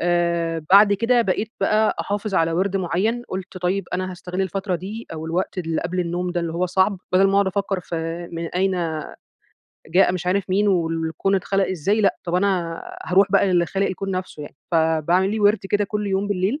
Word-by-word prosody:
آآ 170 -2 0
بعد 200 +1 +7
كده 235 +4 +3
بقيت 215 +3 -1
بقى 215 0 +2
أحافظ 205 0 -3
على 165 -1 +2
وِرْد 190 +3 0
معيّن، 195 +6 0
قُلت 185 0 -6
طيب 180 +2 -1
أنا 185 +1 -2
هاستغل 180 +1 -5
الفترة 190 +1 -2
دي 205 +6 -7
أو 160 0 -6
الوقت 180 +3 -2
اللي 165 -2 -1
قبل 180 +2 -2
النوم 175 +1 -2
ده 175 -1 -1
اللي 165 -1 -3
هو 180 +2 0
صعْب، 190 +2 +1
بَدل 190 +1 +5
ما 195 - 0
أقعد 200 -1 +4
أفكر 195 0 -1
في 165 +1 -5
من 165 0 -4
أين 190 +3 0 1.2
جاء 180 +2 +4
مش 180 -1 -4
عارف 190 +2 +1
مين، 205 +2 +2
والكون 165 +1 0
اتخلق 195 +1 +1
إزاي 190 +5 0
لأ، 200 - +2
طَب 175 0 -3
أنا 180 -3 0 0.2
هاروح 190 +2 +3
بقى - - +4
للي 175 -1 +3
خالق 195 +3 0
الكون 195 +1 -4
نفْسه 185 -5 -4
يعني. 145 - -11 0.2
فباعمل 165 +4 +2
لي 220 0 -2
وِرْد 205 +1 +4
كده 205 0 +2
كل 210 +1 -3
يوم 195 +1 0
بالليل، 200 +8 0
185 Hz, 200 wpm, -22 LUFS, 170-200 Hz, 1.2 s, بعد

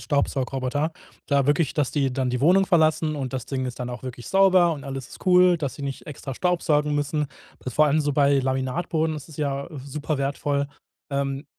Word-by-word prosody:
Staubsaugroboter. 140 +1 -1 0.3
Da 140 -2 +2
wirklich, 145 0 +2
dass 145 -4 +1
die 135 -3 0
dann 130 -1 -1
die 125 0 -1
Wohnung 185 +6 +5
verlassen 155 -3 +2
und 135 -2 -4
das 130 -2 -4
Ding 130 -2 -2
ist 125 - -6
dann 125 0 -3
auch 120 - -7
wirklich 125 -2 -7
sauber 185 -3 +5
und 140 -4 -7
alles 135 -2 -6
ist - - -13
cool, 180 -1 +6
dass 140 -5 -3
sie - - -9
nicht 140 -1 -5
extra 140 -3 -7
staubsaugen 150 -4 +1
müssen. 145 +1 0 0.4
Vor 150 +5 +3
allem 150 +2 +3
so 145 -1 0
bei 140 0 +4
Laminatboden, 135 +5 -1
das 150 +1 -8
ist 155 - -13
ja 140 0 -2 0.2
super 145 +1 -3
wertvoll. 140 +1 -1 0.4
Ähm, 140 0 -2
145 Hz, 195 wpm, -24 LUFS, 135-155 Hz, 0.4 s, cool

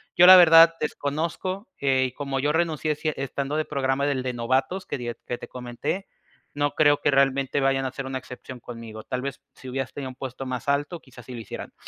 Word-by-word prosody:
Yo, 175 - +7
la 185 - +12
verdad, 165 -2 +8
desconozco, 165 +7 -3
eh, 135 -2 +2
y - - -8
como 140 0 -4
yo 145 +2 +1
renuncié, 160 -2 0
si 155 - -2
e - - -2
estando 140 +1 -3
de 155 0 0
programa 140 -1 0
del 140 -3 0
de 130 -1 -2
novatos 130 +10 -1
que - - -4
die 120 -1 -4
que 120 - -3
te - - -8
comenté, 125 +10 -5 0.5
no 145 0 0
creo 145 -1 +4
que - - +2
realmente 135 0 +2
vayan 135 -1 +1
a 130 - -2
ser 135 +1 -6
una 135 0 -3
excepción 125 0 -10
conmigo. 115 -2 -9
Tal 125 -1 -4
vez, 140 +1 -5
si 130 - -12
hubieras 135 -1 -4
tenido 135 -2 -5
un 130 - -11
puesto 135 0 -6
más 130 -1 -5
alto, 145 +5 0
quizás 125 -2 -15
sí 130 - -9
lo 120 - -6
hicieran. 110 - -8
135 Hz, 225 wpm, -25 LUFS, 130-150 Hz, 0.5 s, la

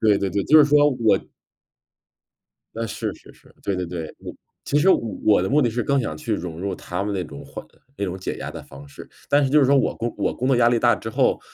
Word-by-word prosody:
对 105 -2 +3
对 100 - -2
对， 100 +1 -1
就 155 - +6
是 150 - +8
说， 145 0 +4
我 115 -7 +2 1.6
那， 115 0 -3
是 105 - -4
是 - - -17
是， - - -23
对 100 -2 -2
对 90 -1 -3
对， 85 -2 -5 0.2
嗯 - - -7 0.3
其 145 - -1
实 180 - +3
我 - - +5 0.3
我 105 -3 +5
的 95 - -1
目 145 +3 +3
的 120 - +1
是 120 +2 -2
更 140 +3 +1
想 75 -11 -4
去 - - -2
融 85 -1 -6
入 95 0 -3
他 90 +2 -5
们 105 0 -3
那 95 - -1
种 - - -10
缓 - - -9 0.3
那 100 - -2
种 95 -1 -4
解 95 - -4
压 - - -5
的 - - -8
方 70 +1 -13
式， 70 - -12 0.2
但 145 0 +3
是 - - +1
就 150 +3 +4
是 - - +4
说 140 +2 +4
我 135 - +1
工 120 +1 -3
我 - - 0
工 130 - -2
作 135 - +3
压 120 -1 +4
力 120 - +2
大 120 +1 +4
之 - - -7
后， 110 - +1
110 Hz, 285 characters per minute, -22 LUFS, 95-135 Hz, 1.6 s, 是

